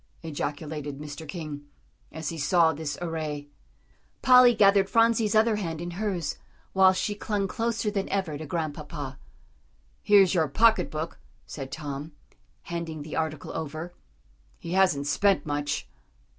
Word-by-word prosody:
ejaculated 150 -1 -4
Mr. 150 +2 -8
King, 145 -2 -6 0.4
as 160 -1 -4
he 165 - -5
saw 160 +2 +4
this 145 0 -4
array. 155 -3 -4 0.7
Polly 250 -2 +7
gathered 195 -1 +5
Phronsie's 230 -2 +3
other 215 0 +4
hand 165 -6 -3
in 175 +1 -5
hers, 180 -4 -3 0.3
while 190 -1 +6
she 190 +2 -1
clung 205 -1 -2
closer 225 +1 -1
than 195 -2 -2
ever 190 -6 -1
to 155 +1 -7
Grandpapa. 150 -3 -4 0.8
"Here's 200 -3 +5
your 160 -4 +2
pocket 225 - +3
book," 155 +2 -5 0.3
said 135 -2 -7
Tom, 145 0 -6 0.5
handing 165 -3 -5
the 155 - -7
article 155 -2 -3
over; 160 +2 -5 0.6
"he 170 - -8
hasn't 180 -7 +3
spent 195 +6 +2
much." 145 -1 -2
165 Hz, 135 wpm, -27 LUFS, 150-195 Hz, 0.8 s, Polly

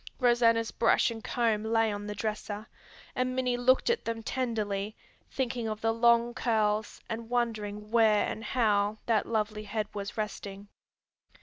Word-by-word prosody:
Rosanna's 235 -2 +3
brush 235 +1 +3
and 225 -1 -7
comb 225 -3 0
lay 225 0 +2
on 205 0 -5
the 210 - -4
dresser, 210 0 -4 0.5
and 255 0 0
Minnie 250 -1 +1
looked 250 +2 +3
at 475 0 +1
them 230 -1 -4
tenderly, 215 -5 -2 0.3
thinking 245 -3 -2
of 215 0 -4
the 225 0 +2
long 235 +1 +4
curls 215 -3 0
and 225 0 -5
wondering 215 -3 -2
where 220 -3 +4
and 220 - -5
how 210 -3 +1
that 225 -3 +1
lovely 215 -1 -1
head 210 0 -2
was 200 0 -5
resting. 205 -2 -5
225 Hz, 150 wpm, -29 LUFS, 210-235 Hz, 0.5 s, long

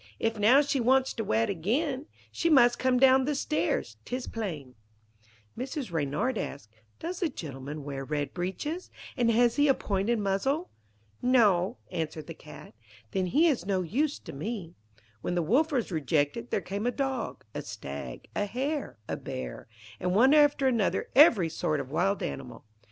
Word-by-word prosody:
"If 225 -1 -1
now 240 +7 +6
she 285 -1 0
wants 260 +2 +3
to 225 - -3
wed 115 - +1
again, 260 - -1 0.2
She 335 - 0
must 240 -5 +5
come 255 -1 +2
down 265 0 +6
the 295 +1 0
stairs, 155 - -1
'tis 250 0 -4
plain."' 160 - -5 0.8
Mrs. 260 - -4
Reynard 160 - -1
asked: 135 -6 -6 0.3
'Does 345 +2 -5
the 345 - +1
gentleman 145 - -7
wear 140 -1 -5
red 145 +1 -3
breeches, 290 - -4 0.3
and 240 -4 +2
has 235 +2 +3
he 290 0 +4
a 270 - +5
pointed 205 +4 0
muzzle?' 220 - -1 0.5
'No,' 215 -5 +3
answered 160 -3 -4
the 165 - -7
Cat. 150 - -13 0.4
'Then 185 -1 0
he 295 - +3
is 265 - +1
no 190 -2 +1
use 275 - 0
to - - -10
me.' 175 +3 -5 0.5
When 175 - -2
the 175 - +1
Wolf 275 - +2
was 245 -8 -1
rejected, 145 -6 0
there - - 0
came 200 +4 -3
a - - +2
Dog, 270 0 -3
a - - -3
Stag, - - -7
a 205 - +1
Hare, 260 - -3
a - - -2
Bear, 65 -2 -6 0.3
and 180 +1 0
one 260 +7 +6
after 290 -2 +5
another 230 -6 +1
every 240 - +7
sort 155 -2 -1
of 135 -1 -6
wild 195 +6 +1
animal. 135 -3 -6
215 Hz, 170 wpm, -29 LUFS, 160-265 Hz, 0.8 s, every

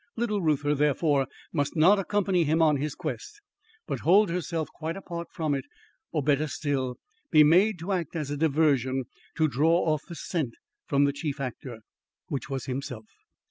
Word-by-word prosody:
Little 215 -3 0
Reuther, 150 -3 +1
therefore, 145 -1 +2 0.3
must 145 -1 -1
not 180 +6 +5
accompany 195 -2 +1
him 160 +2 +1
on 155 -3 +4
his 145 +2 -3
quest, 420 - -6 0.5
but - - -3
hold 195 +1 +4
herself 165 -3 -2
quite 165 +2 -4
apart 170 -3 -6
from 155 -3 -1
it; 135 -2 -2 0.5
or, 150 -4 -1
better 150 +2 +2
still, 135 -4 -2 0.3
be 155 -2 +7
made 180 +7 +4
to 170 +4 -5
act 175 -4 -2
as 150 -3 -3
a - - -1
diversion 140 -4 +2 0.3
to 160 - +3
draw 160 +6 +2
off 150 - -2
the 170 - -8
scent 150 -7 -3 0.3
from 140 0 +3
the 140 0 +2
chief 145 -1 -4
actor, 125 -3 -6 0.5
which 140 - -4
was 135 -2 -3
himself. 125 -4 -5
155 Hz, 175 wpm, -27 LUFS, 140-170 Hz, 0.5 s, be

